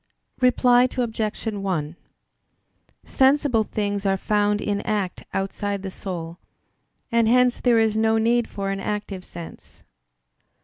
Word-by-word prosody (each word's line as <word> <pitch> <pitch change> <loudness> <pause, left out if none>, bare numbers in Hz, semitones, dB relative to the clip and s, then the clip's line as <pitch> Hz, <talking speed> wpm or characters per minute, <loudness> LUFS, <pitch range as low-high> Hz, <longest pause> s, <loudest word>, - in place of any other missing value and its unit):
Reply 250 -1 +4
Obj. 225 -3 -2
1: 190 -8 -2 1.1
Sensible 265 -4 +3
things 205 -1 -2
are 195 -1 +1
found 205 +1 +1
in 205 -1 -1
act 205 -4 -2
outside 195 +1 -3
the 190 - -5
soul; 175 -3 -6 0.7
and 230 -1 +3
hence 250 +1 +3
there 240 -2 +4
is 220 -1 +2
no 220 0 +2
need 235 +1 +2
for 195 -1 -4
an 195 - -3
active 205 -2 -4
sense. 170 -2 -11
210 Hz, 125 wpm, -23 LUFS, 195-230 Hz, 1.1 s, Reply